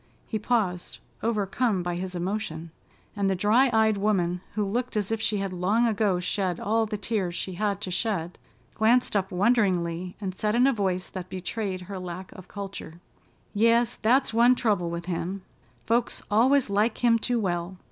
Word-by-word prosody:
He 220 - -3
paused, 205 -6 -1 0.2
overcome 215 -2 0
by 175 0 -2
his 185 +1 -4
emotion, 175 -3 -3 0.4
and 200 -1 +1
the 190 - +1
dry 220 +8 +4
eyed 220 -2 +3
woman, 180 -4 +1
who 215 - +1
looked 235 +3 -2
as 205 0 -1
if 225 -1 -1
she 215 -1 0
had 195 -1 -3
long 200 +7 +2
ago 210 -5 +1
shed 180 -1 -1
all 225 +1 +1
the 210 0 -3
tears 200 -5 -2
she 190 - -4
had 200 +2 -1
to 185 - -4
shed, 180 -3 -2 0.3
glanced 230 +2 +2
up 195 -1 +1
wonderingly 180 -4 +1
and 190 -3 -4
said 210 +3 -1
in 245 +2 +5
a 275 - +4
voice 190 -4 -1
that 185 -1 -6
betrayed 185 +1 -4
her 190 +1 -7
lack 180 +1 -7
of 185 -1 -12
culture: 195 -4 -7 0.5
"Yes, 230 +3 +3
that's 245 +2 +2
one 240 +2 +5
trouble 205 -8 0
with 170 0 -5
him: 180 +2 -3 0.4
folks 235 +1 0
always 255 +6 +4
like 210 +4 0
him 230 -1 +5
too 240 +1 0
well. 175 -2 -2
200 Hz, 180 wpm, -26 LUFS, 180-225 Hz, 0.5 s, in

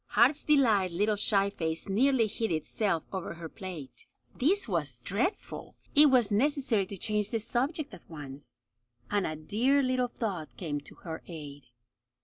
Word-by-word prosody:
Heart's 285 +5 +4
Delight's 220 - +3
little 210 +3 +2
shy 200 -1 +2
face 160 -3 -3
nearly 240 +4 +3
hid 220 0 -2
itself 165 +2 0
over 185 -3 -4
her 165 -1 -7
plate. 160 -8 -9 0.3
This 370 +8 +2
was 150 - -2
dreadful! 230 - -2 0.2
It 295 0 +8
was 245 -5 +4
necessary 245 -3 +2
to 200 - -6
change 210 +1 +1
the 230 - 0
subject 275 +7 -2
at - - -13
once, 145 -3 -9 0.6
and 205 -2 +2
a 155 - -3
dear 240 - +2
little 255 -1 +1
thought 175 - -4
came 145 -2 -2
to - - -13
her 160 -2 -7
aid. 145 -5 -9
200 Hz, 155 wpm, -30 LUFS, 165-250 Hz, 0.6 s, It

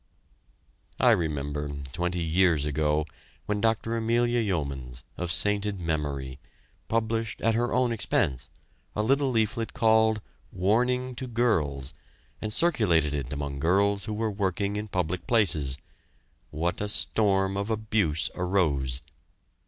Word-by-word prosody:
I - - +6
remember, 75 -2 -1 0.2
twenty 90 0 -1
years 80 -2 +3
ago, 75 +1 +1 0.4
when 105 -1 -1
Dr. 115 0 +1
Amelia 120 +1 +1
Yeomans, 70 - -3
of 90 -1 -3
sainted 100 +3 +2
memory, 70 -5 -3 0.5
published 115 0 -1
at 115 - +2
her 120 +2 0
own 125 -1 +2
expense, 65 - 0 0.5
a 105 - 0
little 135 +4 +2
leaflet 115 -1 0
called 110 -2 +4 0.3
"Warning 125 +7 +1
to 130 0 -4
Girls" 80 - 0 0.5
and 110 - -3
circulated 100 - +2
it 70 -3 -3
among 70 -1 -4
girls 100 +5 +2
who 105 - -3
were 110 0 -1
working 100 0 -1
in 105 +1 -3
public 90 -2 -2
places, 80 - +3 0.7
what 85 +5 -2
a 105 - -1
storm 95 -2 +1
of 100 +2 -2
abuse 105 -8 0
arose. 75 -9 0
100 Hz, 125 wpm, -27 LUFS, 75-110 Hz, 0.7 s, I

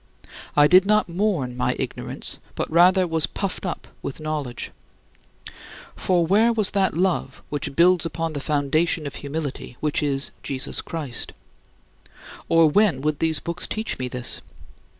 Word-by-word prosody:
I 145 - +8
did 185 +5 +6
not 215 0 +3
mourn 170 -9 -1
my 125 - 0
ignorance, - - -3 0.2
but - - -1
rather 180 +3 +5
was 165 -1 0
puffed 195 -1 -4
up 175 - -5
with 140 - -5
knowledge. 150 -6 -4 1.2
For 175 -2 +2
where 215 +7 +4
was 215 -4 +2
that 190 -4 +1
love 185 0 0
which 145 -1 -2
builds 175 0 +5
upon 165 -1 -3
the 145 - -3
foundation 150 +3 +1
of 140 - -5
humility, 140 -4 -5
which 150 -1 0
is 140 -2 0
Jesus 135 -1 -3
Christ? 145 -8 -5 1.2
Or, 165 -1 +6
when 175 -4 +3
would 150 0 -1
these 160 -2 +2
books 170 +1 -2
teach 220 -8 -3
me 130 - -2
this? 125 -1 -4
160 Hz, 150 wpm, -23 LUFS, 145-185 Hz, 1.2 s, I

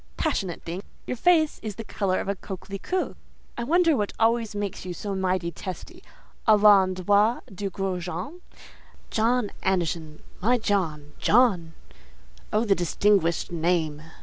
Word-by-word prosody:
"Passionate 195 - -2
thing! 175 +3 -5 0.2
Your - - -3
face 315 +3 +3
is 215 -3 -5
the 225 - -6
colour 195 -3 -1
of - - -4
a 200 - 0
coquelicot. 195 - -4 0.4
I 235 - -3
wonder 335 +4 +3
what 210 -4 -1
always 225 -1 +2
makes 205 -2 -3
you 180 -1 -5
so 200 +2 -4
mighty 185 -2 0
testy 185 0 -8 0.5
à 215 -1 +6
l'endroit 200 +2 +4
du 195 +1 -3
gros 190 -2 -3
Jean? 190 - -6 0.7
'John 230 0 +1
Anderson, 165 -4 -1 0.2
my 240 +6 +3
Joe, 190 -9 0 0.2
John!' 195 -9 +3 0.8
Oh, 215 +2 +2
the 205 - +4
distinguished 180 -1 +1
name!" 160 -3 0
195 Hz, 140 wpm, -26 LUFS, 180-225 Hz, 0.8 s, à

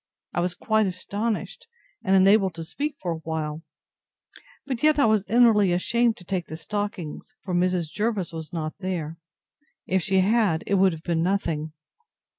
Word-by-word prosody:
I - - -1
was 175 0 -1
quite 220 +1 +1
astonished, 215 - -3 0.4
and 195 -3 +3
unable 195 +1 +5
to 165 0 -6
speak 290 - -3
for 180 - -3
a - - -1
while; 160 -1 -4 1.0
but 260 -4 -3
yet 305 0 +4
I 285 - +4
was 215 -3 +3
inwardly 220 -5 +5
ashamed 235 +6 +1
to - - -13
take 180 -2 -2
the 160 - -6
stockings; 205 -4 -5
for 185 - -4
Mrs. 175 -2 +1
Jervis 210 -6 -1
was 160 -1 -6
not 155 -2 -3
there: 170 -4 -4 0.7
If 190 0 +1
she 190 0 +2
had, 200 -5 +2
it - - -1
would 190 -2 +4
have 160 0 -9
been 170 -2 0
nothing. 165 -4 -1
190 Hz, 170 wpm, -25 LUFS, 165-215 Hz, 1.0 s, unable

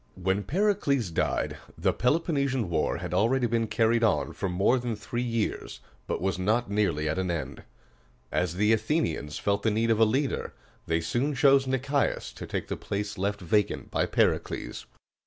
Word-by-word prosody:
When 95 +2 0
Pericles 140 - +1
died, - - -1 0.2
the - - +1
Peloponnesian 140 - 0
War 80 - +1
had - - -5
already 120 +4 +2
been 115 -1 0
carried 115 +2 +2
on 75 -11 +1
for 95 - -3
more 95 +8 +2
than 120 -2 -3
three 120 +3 -4
years, 115 -3 -2 0.3
but - - -2
was 95 -2 0
not 110 +3 +1
nearly 85 -8 +1
at 75 +4 -1
an 95 -1 -1
end. 85 -3 -4 0.7
As 90 -1 0
the 105 +4 +3
Athenians 110 - -1
felt 100 0 0
the 110 - +2
need 115 +2 +1
of 110 - +2
a - - +7
leader, 135 +6 -1 0.3
they 80 0 +1
soon 130 - -1
chose 135 0 +5
Nic´ias 135 +2 0
to - - -8
take - - -3
the - - -3
place 100 0 -4
left 100 +1 -1
vacant 105 +3 0
by - - +1
Pericles. - - -1
110 Hz, 175 wpm, -27 LUFS, 95-130 Hz, 0.7 s, a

